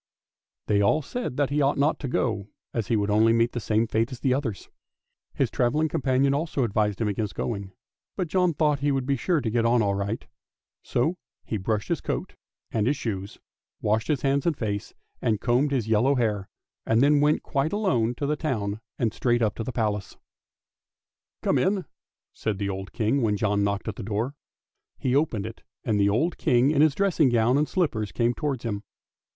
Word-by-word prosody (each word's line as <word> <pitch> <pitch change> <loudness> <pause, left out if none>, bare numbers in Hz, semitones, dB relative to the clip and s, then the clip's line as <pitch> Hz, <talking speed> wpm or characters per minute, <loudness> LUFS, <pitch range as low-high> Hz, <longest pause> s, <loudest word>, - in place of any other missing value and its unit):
" - - -67
They 100 -1 +2
all 150 +10 +3
said 245 - -4
that 140 -1 +1
he 150 +1 +2
ought 140 +1 +2
not 145 +3 +2
to 140 - -4
go 110 -5 -1 0.3
as 115 -4 -2
he 115 - +2
would 105 -1 +1
only 110 +2 +5
meet 115 +1 +3
the 120 - -3
same 110 0 +1
fate 115 +2 0
as 125 - -7
the 130 - +2
others. 125 -8 -3 0.7
His - - +1
travelling 150 +6 +1
companion 135 0 +2
also 145 -2 0
advised 105 -2 0
him 115 - +1
against 105 0 -2
going, 100 -4 -3 0.4
but 185 - -1
John 180 -1 +2
thought 150 -1 +2
he 145 +1 +1
would 135 -2 0
be 140 +1 +1
sure 160 +4 +1
to 115 - -1
get 115 0 +2
on 115 0 +3
all 100 -1 +1
right; 100 +3 -3 0.6
so 160 +9 0 0.3
he 110 - -2
brushed 105 +2 -2
his - - 0
coat - - -3 0.4
and 110 0 +1
his 140 +2 +2
shoes, 100 -5 -4 0.4
washed 110 +2 0
his 145 -5 0
hands 140 +2 +1
and 160 -4 +1
face, 105 -3 -3 0.3
and 110 -3 +1
combed 125 +5 +2
his 130 -6 -1
yellow 115 +6 +3
hair, 105 -6 0 0.3
and 115 +3 +3
then 145 0 +5
went 150 +1 +2
quite 140 +2 0
alone 125 - +1
to 140 - -3
the 150 +2 +1
town 110 -9 -2 0.2
and 115 -3 0
straight 120 -1 +1
up 105 -3 +1
to 115 - -4
the 130 - -4
Palace. 105 -4 -2 0.6
" - - -67
Come - - +2
in," 190 -1 +1 0.5
said 110 -3 -2
the 100 0 -2
old 95 0 -5
King 120 +5 +1
when 105 -3 +1
John 100 -1 +1
knocked 100 +1 -1
at 110 - -4
the - - -5
door. 110 +6 -2 0.6
He 130 0 0
opened 130 -9 +1
it, - - -8 0.2
and 105 -2 +1
the 100 0 +4
old 155 - 0
King 130 -1 +3
in 145 -2 +3
his 155 -2 +4
dressing 175 -7 +3
gown 120 +1 +3
and 150 +1 +2
slippers 120 - 0
came 120 0 +1
towards 140 -3 -3
him. 105 -4 -2
120 Hz, 210 wpm, -26 LUFS, 105-140 Hz, 0.7 s, only